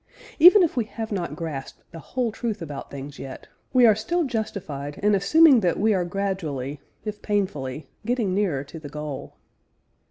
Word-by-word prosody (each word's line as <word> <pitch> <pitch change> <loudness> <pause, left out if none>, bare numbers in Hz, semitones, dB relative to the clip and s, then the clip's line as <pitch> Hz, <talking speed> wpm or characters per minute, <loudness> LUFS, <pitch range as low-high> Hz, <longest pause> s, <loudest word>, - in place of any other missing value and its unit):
Even 360 +5 +9
if 335 - 0
we 240 -3 +1
have 220 0 -6
not 180 -4 -3
grasped 155 -6 -6
the 165 - -9
whole 240 - -2
truth 220 -1 -3
about 145 -5 -7
things 140 +1 -8
yet, 135 -1 -8 0.2
we 255 -2 +6
are 220 - +7
still 335 +12 -1
justified 185 - -4
in 210 0 +4
assuming 270 - +6
that 180 -5 0
we 215 +2 +3
are 180 -3 +1
gradually, 165 -8 -3 0.2
if 210 -1 -5
painfully, 160 -9 -2 0.2
getting 230 -4 0
nearer 185 -9 0
to 155 +3 -10
the 150 -2 -9
goal. 150 -1 -6
195 Hz, 170 wpm, -24 LUFS, 150-220 Hz, 0.2 s, Even